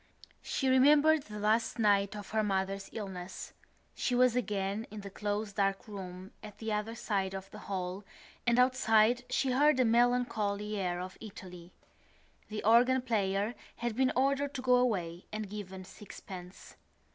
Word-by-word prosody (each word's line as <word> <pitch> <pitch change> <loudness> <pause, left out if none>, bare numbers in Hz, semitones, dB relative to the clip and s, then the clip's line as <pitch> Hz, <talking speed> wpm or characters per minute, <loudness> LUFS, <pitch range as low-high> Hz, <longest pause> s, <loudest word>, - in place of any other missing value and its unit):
She 270 - -2
remembered 295 +4 +5
the 210 0 -8
last 220 +3 +1
night 200 -2 +3
of 205 -2 -8
her 220 0 +2
mother's 195 -1 -1
illness; 190 -4 -7 0.4
she 250 - -1
was 250 -1 +4
again 210 -2 -1
in 210 0 -8
the 200 0 -8
close 205 +1 -3
dark 195 0 0
room 185 -2 -8
at 210 -1 -11
the 220 -1 -3
other 210 +2 -2
side 195 -4 -2
of 195 0 -8
the 210 - -9
hall 185 0 -3 0.4
and 235 0 +4
outside 245 -2 +4
she 260 +1 +1
heard 290 +2 +4
a 255 - +5
melancholy 225 -3 +1
air 180 -3 -1
of 185 +1 -7
Italy. 180 -4 -10 0.8
The 215 0 -4
organ 245 +4 +5
player 205 -2 0 0.2
had 235 -2 -3
been 260 +1 +2
ordered 275 +2 +1
to 255 - -4
go 250 -1 +5
away 180 -9 -1
and 215 -1 -4
given 190 -2 -7
sixpence. 185 -2 -11
210 Hz, 160 wpm, -31 LUFS, 195-245 Hz, 0.8 s, remembered